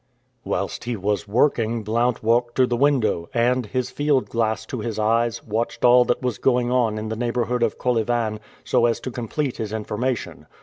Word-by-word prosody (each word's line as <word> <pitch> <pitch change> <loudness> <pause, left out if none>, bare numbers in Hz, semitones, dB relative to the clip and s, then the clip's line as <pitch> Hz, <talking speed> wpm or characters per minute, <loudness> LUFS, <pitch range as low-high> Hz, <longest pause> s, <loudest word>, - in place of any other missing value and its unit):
Whilst - - -3
he 120 0 -2
was 100 -1 -2
working 115 0 +1
Blount 115 +3 0
walked 120 +1 +2
to 130 - +4
the 120 - -1
window 120 -10 +1
and, 120 0 +2
his 125 +3 -2
field 145 -3 +1
glass 110 -3 0
to 125 - -5
his 110 0 -4
eyes, 115 +2 +1
watched 115 +3 -2
all 125 0 +7
that 120 - -1
was 125 -5 -2
going 125 -2 +2
on 120 -4 +1
in 110 0 -4
the 110 - -2
neighborhood 120 +1 -1
of 115 -2 +1
Kolyvan, 115 -2 0 0.2
so 120 -2 +3
as 115 - 0
to 130 - -5
complete 125 +3 -3
his 110 -2 -4
information. 110 +3 -3
120 Hz, 185 wpm, -23 LUFS, 110-125 Hz, 0.2 s, all